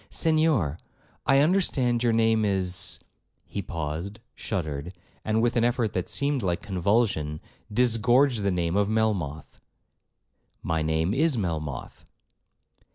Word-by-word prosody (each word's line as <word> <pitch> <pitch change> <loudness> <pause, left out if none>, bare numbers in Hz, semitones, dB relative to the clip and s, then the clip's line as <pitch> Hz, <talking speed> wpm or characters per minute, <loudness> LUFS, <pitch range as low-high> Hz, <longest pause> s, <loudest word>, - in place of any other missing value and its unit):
'Senhor, 155 - +2 0.5
I 135 0 +5
understand 145 -8 +2
your 120 -1 +2
name 110 -1 +3
is—' 95 -3 0 0.5
He 100 - -5
paused, 85 +5 -5
shuddered, 80 -4 -4 0.3
and 110 +1 +1
with 120 +1 +1
an 120 - +2
effort 120 -3 +1
that 90 - -2
seemed 140 -1 0
like 90 -3 -1
convulsion, 95 -5 0 0.3
disgorged 120 +2 +3
the 100 - +1
name 85 -1 -1
of 100 0 +2
Melmoth. 100 -10 -2 1.0
'My 80 -1 -1
name 80 +4 0
is 150 +1 +2
Melmoth.' 75 - -4
105 Hz, 120 wpm, -26 LUFS, 85-120 Hz, 1.0 s, I